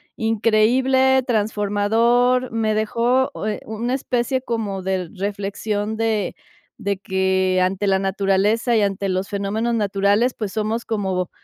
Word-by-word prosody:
increíble, 250 +4 +3
transformador, 225 +3 +1
me 225 -1 0
dejó, 235 +4 +1 0.2
eh, 210 - -2
una 230 +3 -3
especie 255 0 -1
como 215 -6 -3
de 185 -2 -2
reflexión 205 +2 -3
de 220 -4 0 0.5
de 200 -1 -1
que 190 -1 +1
ante 190 +2 0
la 190 0 +3
naturaleza 195 +4 +1
y 215 - +3
ante 195 0 -1
los 185 +1 -1
fenómenos 210 +4 -1
naturales, 205 +3 +1
pues, 210 -4 -5
somos 220 +2 -2
como 190 -5 -2
215 Hz, 125 wpm, -21 LUFS, 195-230 Hz, 0.5 s, increíble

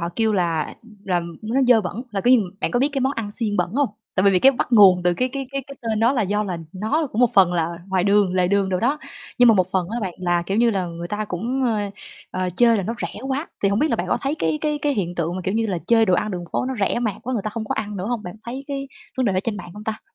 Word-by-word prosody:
họ 170 - -2
kêu 225 -1 +2
là 170 -5 0 0.3
là 180 -2 +1 0.2
nó 230 +5 0
dơ 245 -3 +6
bẩn, 205 +4 -5
là 200 - -2
kiểu 245 +5 +5
như 235 - +4 0.2
bạn - - 0
có 245 - +1
biết 275 - +3
cái 275 - -1
món 265 +1 +1
ăn 225 -6 -4
xiên 210 -1 +1
bẩn 180 -1 0
hông? 285 0 +2 0.3
Tại 190 - +3
vì 200 - +6
vì 185 - +3
cái 270 +7 +6
bắt 250 - -3
nguồn 190 -5 +7
từ 175 0 +2
cái 255 +7 0
cái 275 -1 -4
cái 275 0 -2
cái 275 - -10
tên 220 -2 -1
đó 235 +3 +4
là 250 -5 +1
do 205 +2 0
là 180 -4 -4
nó 225 - -1
cũng 220 - -1
một 245 -2 +5
phần 185 -3 +5
là 170 -1 0 0.2
ngoài 190 -2 0
đường, 200 -2 +3
lề 180 -1 +2
đường 200 0 +2
đồ 185 -1 -1
đó, 275 +6 +1 0.4
nhưng 245 -1 +7
mà 225 - +7
một 185 -3 +1
phần 185 -2 +1
á 235 +3 -3
bạn 190 -5 -3
là, 175 -1 +1
kiểu 195 +4 -2
như 235 0 +4
là, 190 -4 -1
người 170 0 -6
ta 210 +2 -2
cũng, 235 +8 -2
ơ, 210 -4 0 0.4
ờ, 185 0 -2
chê 240 - +5
là 200 - -1
nó 225 +5 -3
rẻ - - -5
quá, 275 +5 -1 0.2
thì 200 - +4
hổng 200 +1 +1
biết 305 +5 +2
là - - +1
bạn - - -2
có - - +2
thấy 275 +2 -1
cái 160 -2 0
cái 300 -1 0
cái 290 - +2
hiện 180 -5 -2
tượng 170 +1 -2
mà, - - -3
kiểu 190 - -1
như 225 0 +1
là, 190 -4 -1
chê 230 -1 +5
đồ 185 - +3
ăn 215 +4 0
đường 180 -3 -4
phố - - 0
nó 265 - -2
rẻ 200 +3 +1
mạt 220 -5 -1
quá, 255 - -4
người 225 -5 -1
ta 215 - -2
không 220 +1 -4
có - - -2
ăn 210 -1 -4
nữa 185 +1 -4
hông? 240 -2 -2
Bạn 180 -3 -7
thấy 260 +4 -6
cái 275 -1 -4 0.3
vấn 260 -2 +1
đề 200 - +2
đó 185 - +1
trên 220 -3 -2
mạng 175 -3 -8
hông 210 +1 -9
ta? 220 0 -3
210 Hz, 320 wpm, -22 LUFS, 185-240 Hz, 0.4 s, nguồn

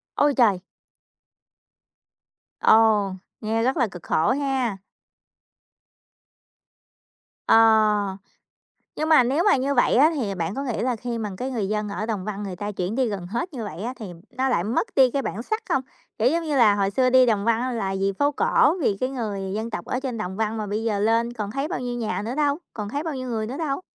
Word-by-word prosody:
Ôi 290 0 +3
trời! 205 -7 +4 2.0
Ồ, 215 -3 +4 0.3
nghe 225 +1 0
rất 260 +5 +1
là 245 -6 +2
cực 180 -3 -10
khổ 160 - +1
ha. 265 -6 -1 2.7
Ờ, 215 -3 +4 0.8
nhưng 310 +1 -2
mà 300 -6 +7
nếu 280 +8 +1
mà 410 - +5
như 275 +2 0
vậy 245 - +3
á 300 +6 +6
thì 205 -8 -2
bạn 170 +3 -3
có 275 - -3
nghĩ 245 -5 -3
là 250 -1 0
khi 235 +1 -4
mà 215 -2 -3
cái 260 +1 -3
người 215 -6 -2
dân 210 0 -2
ở 205 +1 -3
Đồng 215 -5 -3
Văn 210 -1 -4
người 190 -2 -5
ta 205 +3 -4
chuyển 185 +3 -3
đi 260 -2 +1
gần 190 -4 -5
hết 240 - -4
như 245 -4 -5
vậy 200 -3 -7
á 245 +3 -3
thì 220 - -7 0.3
nó 265 +1 +1
lại 210 -9 +1
mất 230 - 0
đi 260 -2 +5
cái 275 - 0
bản 230 -1 -4
sắc 435 - -3
không? 265 - +2 0.4
Kiểu 225 - +2
giống 335 +2 0
như 295 -3 -1
là, 215 -4 +5
hồi 200 -1 0
xưa 255 +4 +2
đi 255 0 +6
Đồng 215 -4 +1
Văn 230 0 +2
á 255 0 -1
là 195 -5 -2
vì 195 0 0
phố 285 +1 +3
cổ, 290 - +3
vì 205 -6 +1
cái 255 +5 -1
người 205 -7 -4
dân 220 +2 -3
tộc 175 - -5
ở 250 - -2
trên 260 -3 -4
Đồng 190 -3 -4
Văn, 220 +1 -1
mà 215 - -3
bây 210 +2 -2
giờ 215 -3 0
lên 230 +3 +1
còn 210 -3 -4
thấy 275 +4 -2
bao 315 - -3
nhiêu 245 -1 -4
nhà 225 -3 -2
nữa 240 +4 -3
đâu, 290 -1 +1 0.2
còn 210 -2 -5
thấy 285 +6 -3
bao 320 -4 -3
nhiêu 255 -1 -5
người 220 -2 -2
nữa 260 +5 -5
đâu? 305 0 -2
230 Hz, 225 wpm, -24 LUFS, 205-260 Hz, 2.7 s, mà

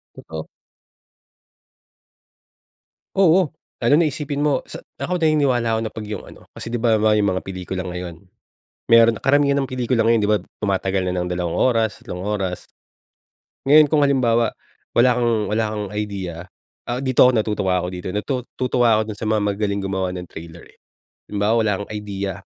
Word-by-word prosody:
Totoo. 80 -1 -8 2.7
Oo. 180 -4 +4 0.3
Lalo 120 +5 +4
na 165 - +3
isipin 145 -1 -3
mo, 145 -1 +1
sa - - -9 0.2
ako, 180 +1 -2
naniniwala 140 -8 +2
ako - - 0
na 110 - -4
'pag 110 -2 -7
yung 105 -2 -5
ano, - - -15
kasi, 115 - -7
'di 120 - -1
ba 115 -2 +3
halimbawa 110 0 +3
yung 100 -1 +2
mga 95 - -2
pelikula 95 0 -5
ngayon, 90 -1 -6 0.8
meron 115 0 +7
na - - -24
karamihan 140 0 +3
ng 135 - 0
pelikula 125 -2 0
ngayon, 115 0 +4
'di 105 - +1
ba 105 - +4 0.2
tumatagal 95 -1 0
na - - -2
ng 90 0 -1
dalawang 90 -1 -2
oras, 115 -4 +1
tatlong 90 0 -6
oras. 95 -3 -3 1.0
Ngayon, 150 +2 +7
kung 150 0 +3
halimbawa, 120 -5 +2 0.4
wala 125 +2 +4
kang 120 -1 +2 0.2
wala 110 +1 +1
kang 105 -1 -3
idea, 95 -5 -4 0.4
ah, 120 +1 -2
dito 130 -2 +4
ako 125 - +6
natutuwa 100 -4 0
ako 90 - -3
dito, 90 - -6
natutuwa 120 0 0
ako - - +2
dun 105 - -9
sa 110 - -5
mga 110 - +2
magagaling 100 0 -1
gumawa 95 -1 -2
ng 90 -1 -7
trailer, 85 +1 -11
eh. - - -24 0.5
Halimbawa, 105 +1 0
wala 110 -2 +1
kang - - -21
idea 100 -2 -4
110 Hz, 175 wpm, -21 LUFS, 95-125 Hz, 2.7 s, meron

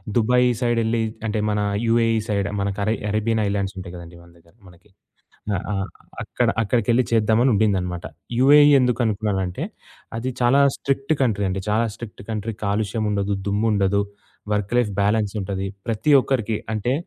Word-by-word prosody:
'Dubai' 125 +2 +3
సైడెళ్లి 115 -1 +1 0.3
అంటే 110 0 -1
మన 105 0 0 0.3
'UAE' 115 -1 +2
side 100 -2 0
మనకరే 100 +2 -1
'Arabian' 110 +1 0
ఐలాండ్సుంటాయి 95 -2 -3
గదండి 85 0 -10
మన 85 - -17
దగ్గర 85 +1 -24
మనకి. 90 +4 -19 0.7
ఆ! - - +1 0.2
ఆ! - - -1 0.5
అక్కడ - - -1
అక్కడికెళ్లి 120 +2 +2
చేద్దామని 115 +3 +3
ఉండిందనమాట. 95 -4 0 0.3
యూఎఈ 145 +3 +7
ఎందుకనుకున్నానంటే, 105 -6 0 0.5
అది 125 +3 -2
చాలా 125 +3 +4 0.2
స్ట్రిక్ట్ 140 +2 -1
కంట్రీ 105 -6 +1
అండి. 95 +1 -2
చాలా 110 +2 +2
స్ట్రిక్ట్ 115 -1 -10
కంట్రీ 110 +1 -3
కాలుష్యముండదు, 100 -1 -1
దుమ్ముండదు, 100 -1 +1 0.5
వర్క్ 105 0 -1
లైఫ్ 120 -4 +2
బ్యాలెన్సుంటది. 100 -2 -1 0.2
ప్రతి 115 +7 +1
ఒక్కరికి 115 -5 -1 0.2
అంటే 110 +4 -1
105 Hz, 130 wpm, -22 LUFS, 100-115 Hz, 0.7 s, యూఎఈ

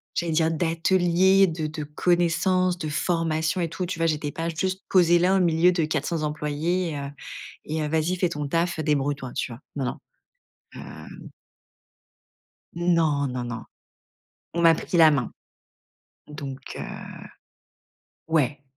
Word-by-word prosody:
j'allais 170 -1 -1
dire 160 0 +2
d'ateliers, 175 +3 +3
de 160 -2 -3
de 155 0 -5
connaissances, 175 +3 +1
de 155 -3 -4
formations 165 +2 0
et 170 - -1
tout, 170 +3 -3
tu 180 - -4
vois? 165 - +2
J'étais 150 -2 -1
pas 165 +2 -3
juste 185 +4 -2
posée 175 -2 +5
là, 185 +2 +3
au 190 - +3
milieu 170 +1 +4
de 175 -2 0
400 155 +1 -2
employés 155 +4 -1
et 145 - -4
heu 140 0 -5 0.6
et 155 +1 -2
heu: - - -1
«Vas-y, 160 +3 +1
fait 180 -1 +1
ton 150 -3 -4
taf, 170 +2 0
heu, - - -1
débrouille 145 -1 +1
toi», 130 -3 -8
tu - - -2
vois? 115 - -11 0.2
Non, 135 - -2
non, 125 - -3 0.8
heu - - -11 1.5
Non 165 -5 +2
non 125 -1 -4
non. 120 -1 -5 0.9
On 170 - -1
m'a 165 -1 +7
pris 175 - -2
la 160 -2 +8
main. 135 -4 0 1.0
Donc 140 -3 -7 0.2
heu - - -4 1.5
ouais, 145 -3 +1
160 Hz, 155 wpm, -25 LUFS, 150-175 Hz, 1.5 s, la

